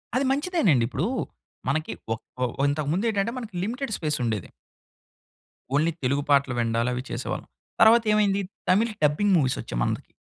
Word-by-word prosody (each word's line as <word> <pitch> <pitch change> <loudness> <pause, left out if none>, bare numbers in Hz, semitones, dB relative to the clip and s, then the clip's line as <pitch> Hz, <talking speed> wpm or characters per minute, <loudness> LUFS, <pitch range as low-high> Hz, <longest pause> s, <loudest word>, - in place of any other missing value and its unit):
అది 265 +2 +2
మంచిదేనండి. 275 - +2
ఇప్పుడు 135 +7 -2 0.6
మనకి 155 +3 -1 0.2
ఒక్ 110 - -8 0.2
ఓహ్! 120 - -1 0.2
ఇంతకుముందు 155 +8 -1
ఏంటంటే, 215 +1 0
మనకి 220 -7 -7
లిమిటెడ్ 245 +4 -3
స్పేస్ 150 -2 -1
ఉండేది. 110 -5 -2 1.3
ఓన్లీ 160 +3 +3
తెలుగు 140 +3 +1
పాటలు 140 -2 +4
విండాలు 115 +1 +1
అవి 125 - -2
చేసేవాళ్ళం. - - -4 0.3
తర్వాత 225 +1 +7
ఏమైంది, 200 -2 +2 0.3
తమిళ్ 220 +5 +3
డబ్బింగ్ 150 +8 +3
మూవీస్ 130 -4 +1
వచ్చాయి - - -5
మందికి. - - -3
160 Hz, 145 wpm, -25 LUFS, 135-220 Hz, 1.3 s, తర్వాత